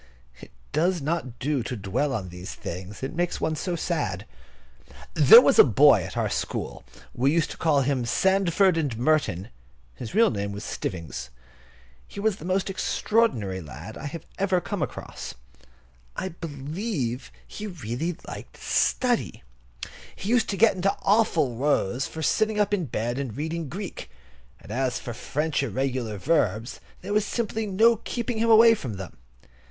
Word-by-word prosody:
It - - -12 0.2
does 175 +4 +1
not 140 -5 -3
do 140 -1 -1
to 120 +1 -4
dwell 120 +9 -1
on 105 -8 -3
these 90 +1 -8
things; 95 +6 -7
it 135 - -3
makes 175 +1 -1
one 155 0 0
so 175 +3 -2
sad. 165 - -2 0.9
There 460 - +10
was - - +3
a - - +12
boy - - +6
at - - -7
our - - +1
school, - - -3 0.3
we 130 +3 +2
used 165 0 +1
to - - -8
call 150 -4 +3
him 130 -2 0
Sandford 190 +5 +3
and 140 -8 -1
Merton. 120 - +1 0.4
His 110 - -8
real 230 +1 +5
name 100 -2 -3
was 100 +1 -6
Stivvings. 80 - -5 0.8
He - - -9
was 210 -1 +1
the 155 - -10
most 185 +1 0
extraordinary 185 - 0
lad 80 +8 -9
I 155 +3 -6 0.2
ever 190 -2 +2
came 200 0 -4
across. - - -5 0.8
I 190 - -3
believe 150 - -4 0.2
he 215 - -7
really 165 - -4
liked - - -9
study. 245 - 0 0.7
He 195 - -6
used 245 0 +3
to 200 - -2
get 225 +1 +5
into 190 +2 0
awful 185 - +2
rows 130 -3 +1
for 160 - -6
sitting 215 +6 +1
up 205 0 +2
in 185 -5 +1
bed 120 0 -2
and 130 -4 -4
reading 160 0 -3
Greek; 190 +3 -6 0.5
and - - -12
as 130 -1 0
for 120 - -6
French 150 +6 -1
irregular 125 -3 -2
verbs 115 - 0 0.2
there 200 +3 -4
was 210 0 +3
simply 220 0 -2
no 225 +4 +4
keeping 235 +1 -3
him 230 +1 +2
away 225 +1 +8
from 130 - -4
them. 95 -1 -8
155 Hz, 160 wpm, -26 LUFS, 120-195 Hz, 0.9 s, a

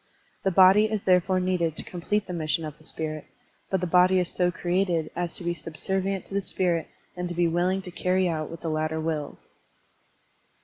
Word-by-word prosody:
The 195 - +1
body 190 +3 +6
is 215 -2 -2
therefore 185 0 +3
needed 180 -3 0
to - - -6
complete 200 +4 -2
the 180 - -6
mission 160 0 -1
of 150 -1 -7
the - - -19
spirit, 155 -1 -4 0.4
but 190 -2 0
the - - 0
body 180 +2 +4
is 180 - -1
so 180 -1 +1
created 175 -2 0
as 175 -1 -2
to - - -1
be 175 0 0
subservient 190 +4 -3
to - - -12
the 200 - +1
spirit 175 -3 0 0.3
and 180 0 -3
to 175 - -5
be 175 0 +3
willing 180 +3 0
to 180 - -7
carry 185 +1 +1
out 155 -3 -2
what 165 - -9
the 165 - -3
latter 155 0 -1
wills. 155 -2 -4
175 Hz, 205 wpm, -26 LUFS, 165-185 Hz, 0.4 s, body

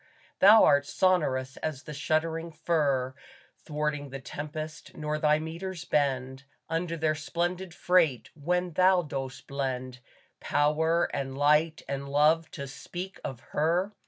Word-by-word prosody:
Thou 210 +3 +8
art 145 -1 +4
sonorous 135 -9 +1
as 155 -3 -4
the 150 - -8
shuddering 160 +3 -1
fir 150 -5 0 0.5
Thwarting 150 -2 -3
the 135 +1 -6
tempest, 155 +3 -7
nor 150 0 -2
thy 150 -1 +4
metres 170 +3 -6
bend 130 -3 0 0.2
Under 165 +1 -2
their 155 -1 +1
splendid 175 +4 -3
freight, 170 -7 +2
when 180 +4 -1
thou 185 +2 +4
dost 135 -3 -5
blend 130 -2 -3 0.4
Power 160 +3 +2
and 135 -1 -3
light 150 +3 +3
and 140 0 -4
love 155 +3 +3
to 140 - -6
speak 180 +7 -7
of 125 -3 -5
Her. 170 +6 +1
155 Hz, 130 wpm, -28 LUFS, 140-170 Hz, 0.5 s, Thou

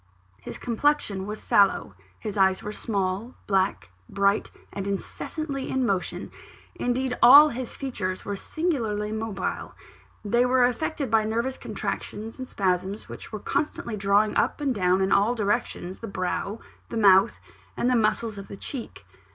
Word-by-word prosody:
His - - -7
complexion 230 -6 0
was 210 +1 -5
sallow; 195 - +3 0.2
his 210 - -5
eyes 190 -1 +3
were 210 - -4
small, 205 +2 -2
black, 190 - 0 0.2
bright, 200 +1 +1 0.2
and 195 0 -4
incessantly 275 - -4
in 265 -1 +1
motion 195 -4 -2 0.4
indeed, 250 +1 -1
all 285 +5 +10
his 255 -1 -5
features 195 -9 -4
were 205 - -2
singularly 220 - -2
mobile: 220 -1 -4 0.5
they 235 +4 +3
were 250 0 +4
affected 275 +1 -2
by 220 -1 +4
nervous 235 +4 -2
contractions 220 +4 -5
and 255 - -5
spasms 190 0 -1
which - - -9
were 215 - -4
constantly 235 -3 -2
drawing 200 +1 +2
up - - +1
and 280 -3 0
down 185 -2 +2
in 190 +1 +1
all 210 +5 +3
directions 200 -3 -2
the 230 - -6
brow, 195 +2 -3 0.3
the - - -4
mouth, 200 0 +5 0.4
and 240 - +1
the 250 - +3
muscles 215 -1 +1
of 195 - -9
the 200 - -9
cheek. 210 - -7
215 Hz, 150 wpm, -26 LUFS, 195-245 Hz, 0.5 s, all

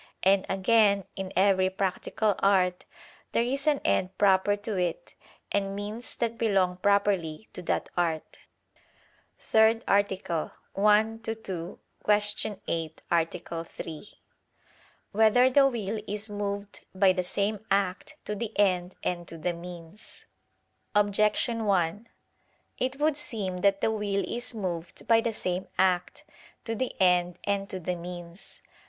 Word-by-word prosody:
And 195 0 +4
again, 200 +1 +3
in 190 -1 -5
every 190 0 +4
practical 195 +2 0
art 185 -2 +2 0.5
there 230 - +3
is 275 +4 -1
an 295 -2 +4
end 185 0 +1
proper 195 0 +4
to 205 +1 -4
it 180 -2 -2 0.4
and 195 -1 0
means 210 +4 -5
that 230 -1 -2
belong 190 -5 +2
properly 200 -3 +1
to - - -6
that 175 - -1
art. 165 -3 -1
________________________ - - -18 1.0
THIRD 220 +1 +3
ARTICLE 190 -5 0 0.2
[I 210 +1 +6 0.3
II, 225 - -1
Q. 175 -2 -6 0.9
8, 160 -1 -3
Art. 165 0 -1
3] 165 +5 -8 1.0
Whether 225 +4 +5
the 275 +1 +6
Will 220 -4 -3
Is 210 +1 -2
Moved 205 0 -4
by 190 0 +5
the 180 0 -1
Same 200 +3 -1
Act 195 +8 0
to 210 - -2
the 220 +1 -5
End 185 -3 +2
and 175 -1 -2
to 165 - -8
the 175 +2 -1
Means? 170 +2 -10 0.7
Objection 210 +3 +2
1: 200 +3 0 0.7
It 260 +2 -1
would 305 0 +2
seem 215 -11 -3
that 195 +1 +2
the - - +2
will 205 -2 -1
is 240 0 -2
moved 175 -5 -5
by 230 -1 +5
the 230 - -1
same 185 -3 -2
act, 180 -2 +1 0.4
to 225 - -2
the 255 +3 -3
end 180 -2 +3
and 200 -1 -1
to 185 - -4
the 180 +1 -2
means. 175 +1 -9
195 Hz, 140 wpm, -28 LUFS, 180-215 Hz, 1.0 s, I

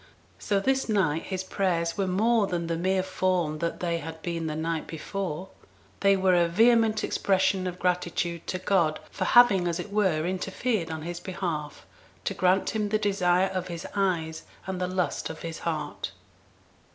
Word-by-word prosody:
So 200 -1 +1
this 265 +4 0
night 165 -7 +1
his 190 -1 -3
prayers 175 -4 0
were 195 -1 0
more 215 +3 +3
than 175 -2 -2
the 165 0 -1
mere 185 +2 +1
form 185 -4 0
that 170 +1 -3
they 170 -1 0
had 160 0 -7
been 165 -2 -2
the 155 - -3
night 160 0 -2
before; 180 +1 -4 0.5
they 195 0 +4
were 190 -1 +3
a 175 -1 +4
vehement 225 +3 +4
expression 190 -1 +1
of 180 0 -4
gratitude 175 -2 -1
to 185 - -1
God 180 -4 +1
for - - -2
having, 205 -7 +6
as 170 0 -1
it 200 +3 -6
were, 185 -7 +2
interfered 190 +1 -1
on 160 -1 -5
his 175 +1 -5
behalf, 170 -6 -4 0.4
to - - 0
grant 185 +1 +2
him 210 -2 -1
the 215 - +2
desire 190 -3 +2
of 185 -1 -2
his 170 -1 -6
eyes 170 -5 0 0.2
and 190 -1 -4
the 180 - 0
lust 185 -1 -1
of 160 - -8
his 165 -1 -5
heart. 155 -3 -3
180 Hz, 175 wpm, -27 LUFS, 170-195 Hz, 0.5 s, having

